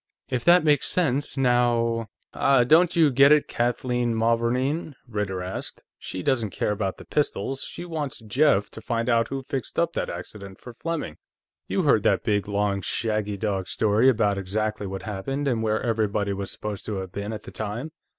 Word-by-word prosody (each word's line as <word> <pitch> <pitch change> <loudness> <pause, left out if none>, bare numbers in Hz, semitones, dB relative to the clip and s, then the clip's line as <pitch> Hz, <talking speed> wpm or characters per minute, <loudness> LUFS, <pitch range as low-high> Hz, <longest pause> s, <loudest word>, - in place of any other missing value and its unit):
"If 125 -1 -1
that 175 0 +6
makes 150 -3 +3
sense, 145 -5 0
now 120 -3 +2
..." - - -47
"Ah, 135 -3 +4
don't 165 +8 +4
you 160 -4 +5
get 140 +3 +6
it, 150 -1 +5
Kathleen 120 0 0
Mavourneen?" 125 +7 0
Ritter 105 -5 -3
asked. 90 +1 -5 0.2
"She 95 -1 -6
doesn't 120 -6 +1
care 100 - -1
about 100 -2 -2
the - - -12
pistols; 135 -2 -1
she 175 - -7
wants 150 -4 -4
Jeff 115 -2 +2
to 110 - -9
find 115 +1 -1
out 115 -1 +3
who 135 0 -4
fixed 130 -3 -5
up 170 0 +1
that - - -2
accident 95 +2 -8
for 125 - -10
Fleming. 165 - -4 0.5
You - - 0
heard - - +4
that - - +2
big, 105 -1 0
long 100 -1 0
shaggy 105 0 -1
dog 95 -3 -2
story 110 +4 +3
about 105 -5 +2
exactly 105 +2 -2
what 95 0 -6
happened 135 +8 -3
and 120 -4 +1
where 110 -1 +1
everybody 105 -3 0
was 100 0 -4
supposed 105 -2 -5
to 105 - -2
have 95 -2 -5
been 100 +2 -4
at 110 -1 -6
the - - -10
time. 110 +8 -4
115 Hz, 190 wpm, -25 LUFS, 105-135 Hz, 0.5 s, that